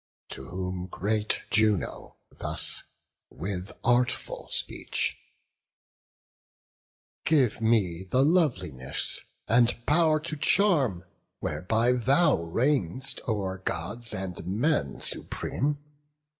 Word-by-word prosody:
To 65 - -8
whom 90 0 -4
great 105 +3 -1
Juno 110 -4 +1 0.2
thus, - - +4 0.5
with 90 +2 -5
artful 120 0 0
speech: - - 0 2.1
"Give 135 -8 +2
me 95 -6 +1
the 130 +7 +3
loveliness, 100 - 0 0.3
and 120 +1 +4
pow'r 155 0 +3
to 155 -1 -5
charm, 145 - +2 0.3
Whereby 110 +11 +1
thou 135 +8 +3
reign'st 115 - -1
o'er 95 -4 -2
Gods 105 +6 -4
and 95 -1 -5
men 105 - 0
supreme. 145 +2 -2
110 Hz, 90 wpm, -27 LUFS, 90-140 Hz, 2.1 s, thus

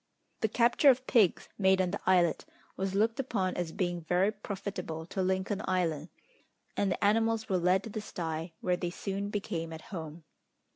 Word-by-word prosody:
The 220 - +2
capture 240 +6 +4
of 255 0 +3
pigs, 215 -9 +3
made 190 -1 +4
on 185 -1 +1
the 205 - -3
islet, 180 -3 +3 0.3
was 190 0 -2
looked 225 +5 +2
upon 200 -8 -1
as 175 -2 -2
being 175 -3 -2
very 180 +5 +2
profitable 195 -6 -5
to 190 +3 -3
Lincoln 190 +2 0
Island, 170 -4 0 0.7
and 200 -2 +1
the - - -2
animals 225 +1 +2
were 185 -2 +2
led 180 +2 +3
to 220 - -7
the 215 - -4
sty, 165 -4 -4
where 180 -1 +1
they 175 - -2
soon 195 +3 -4
became 170 -5 -3
at 160 0 -7
home. 160 -1 -6
190 Hz, 180 wpm, -31 LUFS, 175-205 Hz, 0.7 s, capture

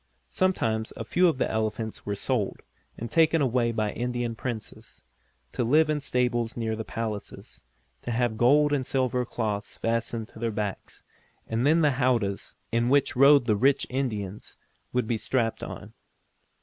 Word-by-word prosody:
Sometimes 115 -13 0
a - - -4
few 180 +1 +3
of 160 - +1
the - - +1
elephants 110 0 -3
were 100 - -1
sold, 105 -1 -2 0.3
and 115 0 -6
taken 165 0 +4
away 125 -4 +1
by 110 -2 -1
Indian 120 -1 -2
Princes, 115 -1 -7 0.5
to - - -1
live 155 +6 +4
in 150 - 0
stables 125 -4 -1
near 110 -1 -1
the 110 - -4
palaces, 110 -2 -6 0.4
to - - -6
have 120 -1 0
gold 145 +6 +4
and 140 -2 +1
silver 125 -1 0
cloths 105 -4 -3
fastened 115 0 -2
on 110 - -10
their 115 - 0
backs, 105 -2 -5 0.4
and 115 +4 0
then 160 +2 +4
the 145 -4 +2
howdahs, 115 -6 0 0.2
in 115 +1 +1
which 140 0 +3
rode 140 0 +6
the 110 -3 +2
rich 135 +6 +3
Indians, 105 -7 -4 0.3
would 125 -1 0
be 115 0 -1
strapped 115 +1 -1
on. - - -8
120 Hz, 160 wpm, -27 LUFS, 110-130 Hz, 0.5 s, rode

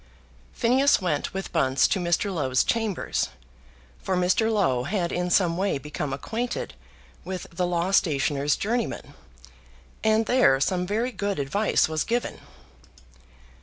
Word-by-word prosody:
Phineas 265 +4 +3
went 170 -7 -1
with 195 0 -5
Bunce 135 -5 +2
to 195 - +1
Mr. 175 +3 0
Low's 130 -6 +1
chambers, 225 -5 -1 0.7
for 185 - -1
Mr. 185 +5 +2
Low 150 - +1
had 175 0 -1
in 180 0 -1
some 175 -2 +2
way 195 -4 0
become 150 +1 -5
acquainted 220 - -4 0.5
with 185 +1 -5
the 175 +1 -1
law 175 +1 -1
stationer's 145 -5 +2
journeyman, 230 +2 -3 0.9
and 220 0 +3
there 245 - +4
some 180 +5 0
very 225 +6 -1
good 200 -4 -3
advice 150 +10 +1
was 155 -1 -1
given. 240 +1 -2
180 Hz, 130 wpm, -25 LUFS, 150-215 Hz, 0.9 s, there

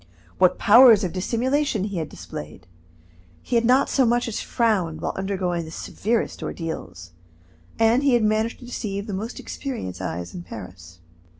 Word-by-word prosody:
What 185 -1 +4
powers 230 -1 +7
of 180 - -2
dissimulation 240 +4 0
he 200 -2 -3
had 160 -2 -3
displayed! 75 +4 -9 0.8
He - - -2
had 235 0 +3
not 255 +3 +4
so 270 - +2
much 240 0 +2
as 225 - -3
frowned 190 -9 0
while - - -3
undergoing 185 -3 -2
the 160 - -9
severest 220 +7 -2
ordeals, 125 - -6 0.7
and 225 +3 +4
he 275 -3 +3
had 235 - +2
managed 215 +2 +1
to - - -10
deceive 200 -5 -4
the 210 - -5
most 220 +5 -5
experienced 235 - -6
eyes 90 -1 -4
in 175 - -6
Paris. 90 - -11
205 Hz, 165 wpm, -23 LUFS, 165-235 Hz, 0.8 s, powers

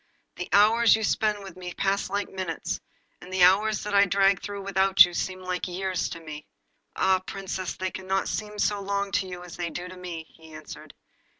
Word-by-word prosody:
The 180 - -5
hours 220 +3 +6
you 220 - -3
spend 210 -1 0
with 190 -3 -10
me 180 -1 -7
pass 195 0 0
like 200 +1 -1
minutes, 185 -4 -4 0.4
and 180 - -11
the 185 -1 +3
hours 205 +3 +4
that 210 0 -4
I 200 0 +6
drag 195 0 +3
through 200 0 -6
without 190 -2 +6
you 175 - -8
seem 185 +1 -3 0.2
years 185 0 -2
to 170 - -7
me.' 155 -2 -9 0.5
'Ah, 190 0 +3
Princess, 185 -1 -5
they 185 0 -3
cannot 190 0 -2
seem 210 0 -4
so 205 -1 +1
long 200 0 -2
to 190 - 0
you 180 -1 -7
as 175 -2 -10
they 175 -1 -2
do 175 +2 -6
to 185 - -10
me!' 175 -3 -6
he 160 -1 -16
answered. 155 0 -10
190 Hz, 200 wpm, -26 LUFS, 180-200 Hz, 0.5 s, hours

